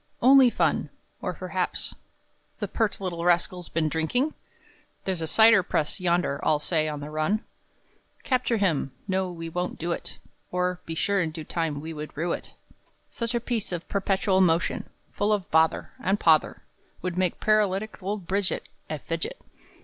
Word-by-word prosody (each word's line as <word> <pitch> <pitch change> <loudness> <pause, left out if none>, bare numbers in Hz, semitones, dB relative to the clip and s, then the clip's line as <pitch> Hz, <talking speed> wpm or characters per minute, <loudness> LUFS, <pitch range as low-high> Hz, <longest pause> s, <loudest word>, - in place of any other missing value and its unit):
Only 260 0 +7
Fun! - - +1 0.3
or, - - -3
perhaps, - - -2 0.6
The - - -3
pert 220 -3 0
little 175 -3 -3
rascal's 175 0 +1
been 160 -1 +1
drinking? 165 - 0 0.7
There's 185 -3 -1
a 160 - -1
cider 220 +2 +7
press 155 -2 -1
yonder 175 -5 +1
all 155 -1 +3
say 155 +1 +1
on 150 -1 -5
the 150 +1 -6
run! 155 +5 +1
III. 215 - +2 0.8
Capture 250 -3 +1
him! 165 -9 +1
no, 190 -1 0
we 165 -1 -6
won't 180 +2 -3
do 170 +2 -2
it, - - -4 0.3
Or, 180 0 0
be 165 - -3
sure 200 +3 +1
in 165 - 0
due 160 0 -7
time 160 -2 -2
we 160 +1 -6
would 150 -1 -7
rue 170 +3 0
it! - - -5
IV. - - -31 0.4
Such 235 0 -2
a - - +2
piece 230 -4 -2
of 175 -1 -4
perpetual 195 -1 +2
motion, 170 -2 +2 0.2
Full 205 +1 0
of 205 -4 0
bother 160 0 +3
And 195 +2 +1
pother, 160 -2 +3 0.4
Would 180 -1 -2
make 180 -2 0
paralytic 215 -1 +1
old 195 0 -3
Bridget 195 +2 -1 0.2
A - - -2
Fidget. - - -4
180 Hz, 170 wpm, -26 LUFS, 160-205 Hz, 0.8 s, Only